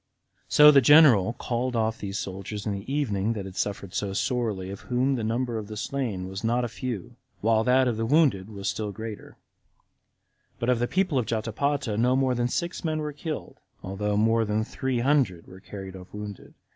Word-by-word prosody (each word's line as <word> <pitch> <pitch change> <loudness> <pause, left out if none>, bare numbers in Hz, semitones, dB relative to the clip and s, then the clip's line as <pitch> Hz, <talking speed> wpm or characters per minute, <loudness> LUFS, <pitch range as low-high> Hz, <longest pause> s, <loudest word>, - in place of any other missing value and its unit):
So 150 0 +8
the 140 -2 +6
general 125 - +6
called 125 +1 -2
off 110 0 0
those 100 0 -4
soldiers 100 +2 -5
in 105 - -1
the 100 +6 -6
evening 115 -7 0
that 100 -3 -5
had 95 -1 -9
suffered 100 -2 -3
so 100 0 -2
sorely, 105 -5 -1
of 100 - -7
whom 130 +2 +2
the 120 -4 -2
number 115 +1 -1
of 105 - -7
the 105 0 -7
slain 110 -7 -3
was 95 +1 -6
not 120 +2 +1
a - - -1
few, 120 -5 -6 0.2
while 110 0 +3
that 130 +1 +4
of 120 -3 0
the 115 - -1
wounded 130 - +3
was 100 -2 -6
still 105 -2 -2
greater; 110 +1 -8 1.2
but 120 - -2
of 125 -2 +3
the 120 - +1
people 185 -5 +1
of 115 - -2
Jotapata 115 +1 -1
no 125 +3 +3
more 130 -1 +2
than 120 0 0
six 170 +9 -3
men 155 -2 -1
were 150 -1 -3
killed, 155 +2 -6 0.2
although 100 +2 -2
more 115 +2 +3
than 105 0 0
three 130 +2 -2
hundred 125 - +1
were 95 - -13
carried 95 -1 -9
off 90 0 -12
wounded. 105 -1 -8
115 Hz, 200 wpm, -26 LUFS, 100-130 Hz, 1.2 s, So